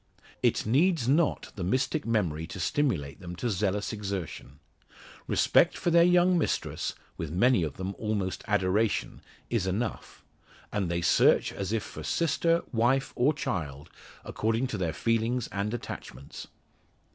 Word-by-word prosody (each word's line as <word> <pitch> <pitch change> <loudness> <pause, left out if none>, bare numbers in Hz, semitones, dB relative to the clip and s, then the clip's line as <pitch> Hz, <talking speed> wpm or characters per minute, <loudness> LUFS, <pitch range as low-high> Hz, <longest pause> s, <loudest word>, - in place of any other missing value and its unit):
It - - +2
needs 145 - +2
not 150 +3 +1
the 95 - -4
mystic 130 - 0
memory 85 -9 0
to 95 - -8
stimulate 90 - -1
them 90 -2 -7
to 120 +6 -2
zealous 100 +2 -1
exertion. 95 -9 -5 0.7
Respect - - +3
for 175 - 0
their 170 0 +6
young 180 0 +4
mistress - - -2 0.2
with 80 - -4
many 105 - +3
of 75 -4 -2
them 95 +1 -4
almost 105 -4 -2
adoration 105 +1 0 0.3
is 110 -6 0
enough; 105 +5 -4 0.5
and 100 -4 -1
they 85 0 -1
search 85 - +4
as 100 0 -4
if 115 -2 0
for - - -9
sister, 165 0 +1
wife, 125 +4 +1
or 130 +5 +3
child 80 - -4 0.3
according 115 +3 0
to 130 - -3
their 85 -3 0
feelings 115 +4 0
and 100 +1 -2
attachments. 70 - -7
105 Hz, 145 wpm, -28 LUFS, 90-130 Hz, 0.7 s, their